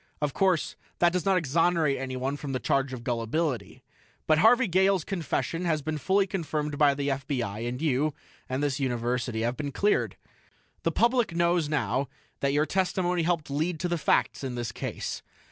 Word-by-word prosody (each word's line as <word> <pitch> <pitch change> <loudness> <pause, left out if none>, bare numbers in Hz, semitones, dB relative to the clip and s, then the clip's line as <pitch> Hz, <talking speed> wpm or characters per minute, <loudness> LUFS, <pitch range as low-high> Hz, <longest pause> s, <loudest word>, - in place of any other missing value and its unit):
"Of 150 -2 -1
course, 185 -4 +1 0.2
that 175 0 +4
does 180 -2 -1
not 195 -1 +4
exonerate 165 -2 +2
anyone 130 +1 -2
from 145 -1 -5
the 130 - -1
charge 135 0 0
of 125 -2 -6
gullibility. 120 - -2 0.4
But 155 0 +4
Harvey 245 +6 +5
Gale's 190 0 +3
confession 170 -1 -2
has 155 -4 0
been 155 0 -2
fully 195 +7 +2
confirmed 155 -6 -3
by 145 -2 +5
the 140 0 -1
FBI, 125 -5 -2
and 125 +1 -5
you 150 -1 +1 0.3
and 130 +3 -1
this 140 -2 0
University 120 -2 -1
have 120 +2 0
been 145 -1 -3
cleared. 205 +8 +1 0.6
The - - +1
public 235 -6 +2
knows 170 -2 +2
now 135 -2 0 0.3
that 140 - +1
your 145 +2 +2
testimony 180 -1 0
helped 165 -3 -1
lead 160 +3 -1
to 180 - 0
the 175 -1 -1
facts 145 - +1
in 130 -2 -3
the 120 -1 -3
case. - - -4
150 Hz, 180 wpm, -27 LUFS, 130-175 Hz, 0.6 s, Harvey